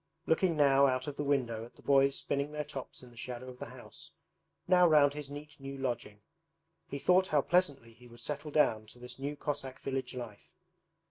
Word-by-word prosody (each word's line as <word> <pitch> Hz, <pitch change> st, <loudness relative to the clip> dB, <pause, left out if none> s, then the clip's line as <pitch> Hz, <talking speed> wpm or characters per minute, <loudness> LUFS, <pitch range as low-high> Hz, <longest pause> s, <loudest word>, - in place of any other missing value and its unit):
Looking 165 Hz, 0 st, +2 dB
now 140 Hz, -1 st, +6 dB
out 130 Hz, -1 st, 0 dB
of 145 Hz, -, -5 dB
the 145 Hz, -, -2 dB
window 125 Hz, -6 st, 0 dB
at 115 Hz, -, -12 dB
the -, -, -19 dB
boys 140 Hz, 0 st, +4 dB
spinning 140 Hz, +1 st, -1 dB
their 150 Hz, 0 st, -2 dB
tops 135 Hz, -3 st, -8 dB
in 125 Hz, -, -13 dB
the -, -, -18 dB
shadow 125 Hz, +1 st, -6 dB
of 125 Hz, 0 st, -11 dB
the -, -, -6 dB
house, -, -, -11 dB, 0.6 s
now 180 Hz, -1 st, +6 dB
round 145 Hz, -3 st, +5 dB
his 145 Hz, -1 st, -6 dB
neat 145 Hz, 0 st, -9 dB
new 135 Hz, 0 st, -7 dB
lodging, 120 Hz, -6 st, -4 dB, 0.6 s
he 140 Hz, -, -4 dB
thought 185 Hz, +6 st, +4 dB
how 150 Hz, -4 st, +3 dB
pleasantly 140 Hz, -10 st, +1 dB
he 120 Hz, +2 st, -17 dB
would 120 Hz, 0 st, -14 dB
settle 150 Hz, +1 st, -4 dB
down 115 Hz, -8 st, +2 dB
to 110 Hz, -, -12 dB
this 125 Hz, +1 st, -8 dB
new 140 Hz, +2 st, -3 dB
Cossack 135 Hz, -3 st, -4 dB
village 135 Hz, -1 st, -3 dB
life. 115 Hz, -5 st, -8 dB
140 Hz, 205 wpm, -32 LUFS, 125-145 Hz, 0.6 s, now